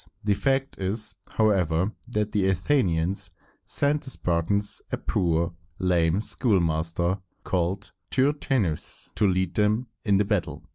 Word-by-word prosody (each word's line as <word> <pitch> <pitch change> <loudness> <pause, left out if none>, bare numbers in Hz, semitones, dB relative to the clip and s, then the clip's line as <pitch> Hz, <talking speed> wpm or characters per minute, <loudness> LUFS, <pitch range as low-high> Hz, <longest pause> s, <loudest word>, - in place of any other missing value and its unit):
The 105 0 +3
fact 135 +5 0
is, 105 +3 0 0.2
however, 95 -4 +2 0.2
that 105 -3 -1
the 100 -3 +1
Athenians 95 - +1 0.4
sent 145 +1 +2
the - - -6
Spartans 100 +1 +1
a - - 0
poor, 85 -1 0 0.2
lame 90 0 +2
schoolmaster, 85 - +1 0.2
called 95 +2 -1 0.2
Tyr 135 +3 +3
tæ´us, 120 - -2
to 105 - +2
lead 95 -2 0
them 105 +4 +2 0.2
in 100 -3 +3
battle. 100 0 -1
100 Hz, 125 wpm, -26 LUFS, 85-110 Hz, 0.4 s, The